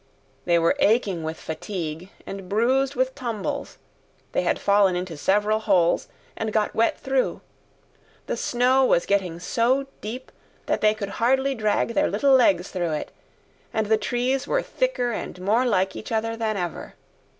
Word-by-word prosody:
They 170 -1 +3
were 165 +9 +3
aching 210 - +2
with 160 0 -5
fatigue 165 +1 -5 0.2
and 195 -2 -7
bruised 260 +6 +2
with 260 +1 0
tumbles; 235 -7 -4 0.5
they - - +1
had - - +1
fallen 200 -2 +3
into 180 -2 -4
several 210 +7 +1
holes 185 -6 +2 0.3
and 220 -1 -3
got 210 -1 0
wet 230 +1 +2
through; 265 -1 -1 0.8
the - - -2
snow 255 +2 +2
was 175 -9 +3
getting 185 -4 0
so 245 +9 +1 0.2
deep 240 +5 -7 0.3
that - - -1
they 215 0 +4
could 205 -2 -5
hardly 265 +3 +3
drag 215 -3 0
their 295 - +2
little 280 -1 +3
legs 195 -8 +4
through 175 -4 -1
it, 150 - -4 0.6
and 220 -1 0
the 220 +1 +3
trees 255 +5 -1
were - - +1
thicker - - -1
and 210 - -5
more 220 +7 +2
like 190 -4 +1
each - - -8
other 225 0 -1
than 220 -2 -2
ever. 175 -3 -5
215 Hz, 160 wpm, -24 LUFS, 185-250 Hz, 0.8 s, they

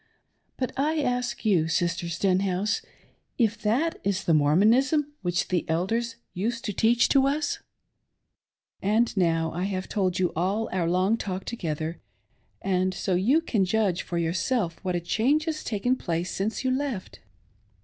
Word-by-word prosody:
But 255 - -2
I 305 +4 +1
ask 250 -2 -2
you, 180 -7 +3
Sister 170 +1 0
Stenhouse, 190 +3 +1 0.6
if 225 -3 +2
that 260 +11 +1
is 195 0 0
the 170 - +2
Mormonism 230 - +3
which 175 -2 -1
the 180 -2 +1
elders 225 +8 0 0.2
used 230 +6 -2
to 205 - -2
teach 235 +6 +3
us? 280 +2 +2 1.2
And 220 +4 +2
now 165 -3 +1
I 180 +3 -2
have 190 -1 -3
told 185 -4 0
you 180 -1 +1
all 195 +7 0
our 175 -2 0
long 185 +5 +2
talk 190 -3 -4
together 160 -6 -4 0.6
and 185 -1 +1
so 190 - -1
you 235 - +3
can 220 -11 +1
judge 190 -2 +1
for 175 - -4
yourself 170 +3 -1
what 180 -1 -1
a - - +1
cjiange 250 - +2
has 315 -2 -3
taken 240 +4 0
place 170 -6 -2
since 215 +6 -2
you 260 - +1
left. 260 -7 -3
195 Hz, 150 wpm, -26 LUFS, 175-240 Hz, 1.2 s, you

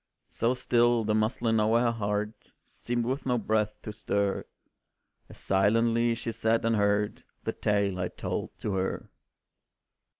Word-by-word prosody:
So 120 +3 0
still, 120 -2 +2
the 105 0 0
muslin 110 +1 +1
o'er 110 +2 +3
her 120 -1 +2
heart 105 -1 -3
Seemed 120 -1 -3
with 130 +2 -2
no 125 -1 +2
breath 105 -1 0
to 105 - -6
stir, 100 -2 -1 0.8
As - - -13
silently 115 +4 +2
she 115 0 -4
sat 115 0 +1
and 115 0 +2
heard 105 0 +1 0.2
The - - -2
tale 100 -3 0
I 90 - 0
told - - -5
to 105 - -2
her. 95 0 -2
110 Hz, 145 wpm, -28 LUFS, 105-115 Hz, 0.8 s, o'er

